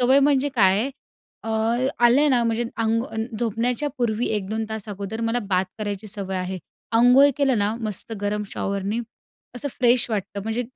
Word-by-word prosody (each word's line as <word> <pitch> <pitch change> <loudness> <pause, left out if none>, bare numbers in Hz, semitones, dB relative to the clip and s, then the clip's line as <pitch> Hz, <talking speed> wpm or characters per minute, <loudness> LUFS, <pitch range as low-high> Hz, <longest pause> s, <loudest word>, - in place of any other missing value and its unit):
सवय 260 +2 +5
म्हणजे 285 0 +3
काय 195 -4 +5
आहे. 265 +5 -1 0.5
अ, 225 - -4 0.5
आले 255 +5 +5
ना 245 -3 +3
म्हणजे 230 +1 0
अंग 225 0 +1 0.4
झोपण्याच्या 240 +5 0
पूर्वी 235 -1 0
1-2 215 +2 -3
तास 220 -1 -5
अगोदर 205 +2 -5
मला 240 - +1
बाथ 185 0 +3
करायची 205 0 -4
सवय 195 -2 -4
आहे. 185 0 -3 0.3
अंघोळ 250 +5 +6
केलं 270 -5 +2
ना, 205 +1 +1
मस्त 215 0 -3
गरम 210 +1 -1
शॉवरनी 200 +3 -2 0.5
असं 270 +4 -4
फ्रेश 245 0 +4
वाटतं. 200 -1 -3
म्हणजे 225 +3 -1
225 Hz, 160 wpm, -23 LUFS, 205-245 Hz, 0.5 s, अंघोळ